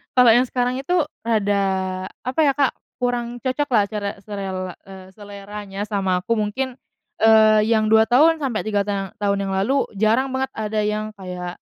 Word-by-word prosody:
kalau 250 -1 +7
yang 240 +3 +5
sekarang 250 0 -1
itu 275 +7 -3 0.3
rada, 205 -3 +1 0.6
apa 255 +5 -4
ya 275 - +3
Kak, 275 -2 +1 0.2
kurang 245 -1 -2
cocok 265 +3 -1
lah 210 - +5
cara 210 -2 -3
selela 190 -3 -5
e 195 - -12 0.2
seleranya 205 0 -8
sama 190 -3 0
aku. 230 +3 -1
Mungkin, 245 +5 -2 0.4
eee, 220 -1 +5
yang 220 -1 +2
2 220 0 +6
tahun, 305 +8 +4
sampai 270 -8 -2
3 205 -2 -1
ta 195 -2 -3
tahun 200 -2 0
yang 195 - -2
lalu, 265 +9 +1
jarang 225 +6 +2
banget 265 0 -3
ada 215 -1 -2
yang 215 0 -2
kayak, 180 -2 -6
215 Hz, 170 wpm, -21 LUFS, 200-245 Hz, 0.6 s, kalau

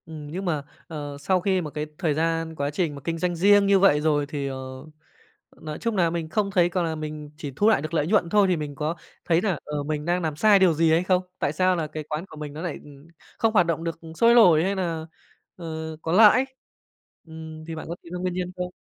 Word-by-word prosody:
Ừm, 155 -2 -9
nhưng 190 +4 -4
mà, 155 -5 -1 0.2
à, 160 -3 -7 0.2
sau 185 +5 +1
khi 190 0 +1
mà 155 -3 -6
cái 150 +1 -3
thời 165 -5 0
gian 165 +1 -1
quá 140 -1 -2
trình 155 -1 -1
mà 140 - -9
kinh 165 0 -2
doanh 175 +1 -1
riêng 200 +3 +5
như 200 -1 +5
vậy 165 -7 +4
rồi 150 -2 +1
thì, 145 -1 -4
ờ, 130 -1 -7 0.8
nói 155 -1 -6
chung 230 -2 -2
nà 175 -3 +3
mình 165 -1 -4
không 200 +3 0
thấy 175 -3 +3
có 175 0 -1
là 160 -1 -2
mình 150 -1 -7
chỉ 145 -3 -6
thu 210 - +3
lại 220 - +3
được 155 +2 -6
nợi 155 -2 +1
nhuận 190 -3 +2
thôi 205 +1 +4
thì 180 -2 +1
mình 150 -2 -5
có 155 +4 -2 0.3
thấy 170 0 +2
nà, 190 -5 0
ờ, 150 -1 -4
mình 150 0 -3
đang 175 +1 0
làm 160 -3 -2
sai 205 +4 +5
điều 185 -3 +5
gì 160 +1 +2
hay 165 +2 +3
không? 185 0 +2 0.2
Tại 145 - 0
sao 185 +3 +2
nà 165 -3 -2
cái 155 0 -6
quán 155 +3 -5
của 155 - -13
mình 150 -1 -7
nó 155 - -7
nại 175 -3 -4 0.6
không 225 -1 +1
hoạt 180 -5 +5
động 165 -1 -1
được 165 -1 -4 0.2
sôi 230 +6 +5
nổi 175 -9 +6
hay 195 +2 0
nà, 165 -4 -3 0.5
à, 175 - -9 0.4
có 160 - -3
lãi, 220 +7 +6 0.8
ừm, 160 -1 -9
thì 165 0 -6
bạn 160 - -7
có 170 - -3
tìm 170 - -11
ra 180 - -4
nguyên 180 0 -2
nhân 180 0 -3
không? 180 0 -4
165 Hz, 255 wpm, -25 LUFS, 155-185 Hz, 0.8 s, nổi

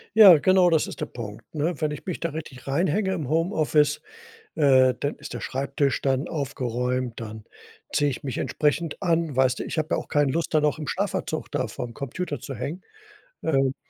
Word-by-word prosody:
Ja, 195 -7 +10
genau, 185 +2 +5
das 160 -2 +2
ist - - -8
der - - -1
Punkt, 115 -1 -8
ne? 160 +4 -1
Wenn 155 -1 0
ich 150 - -7
mich 180 - -3
da 170 - -1
richtig 145 -5 -8
reinhänge 185 +7 +1
im 155 -8 -3
Homeoffice, 155 -2 +2 0.5
äh, 130 -4 +5
dann 145 - -2
ist 150 - -9
der - - -4
Schreibtisch 140 0 -1
dann 135 +3 0
aufgeräumt, 125 -4 -2
dann 110 -1 -7 0.5
ziehe 145 -1 +2
ich 130 - -6
mich 135 -4 -4
entsprechend 150 +3 -1
an. 165 -4 +1
Weißt 130 0 +3
du, - - -3
ich - - -4
habe 155 0 0
ja - - +2
auch - - -4
keine 145 -3 +2
Lust, 165 +3 -2
da 155 - +5
noch 150 0 +1
im 155 - -5
Schlafanzug 190 -5 -2
da 135 -4 -1
vorm 120 +2 -6
Computer 145 +5 -4
zu 135 - -7
hängen. 145 - -5 0.6
Ähm, 135 -3 +2
145 Hz, 200 wpm, -25 LUFS, 130-165 Hz, 0.6 s, Ja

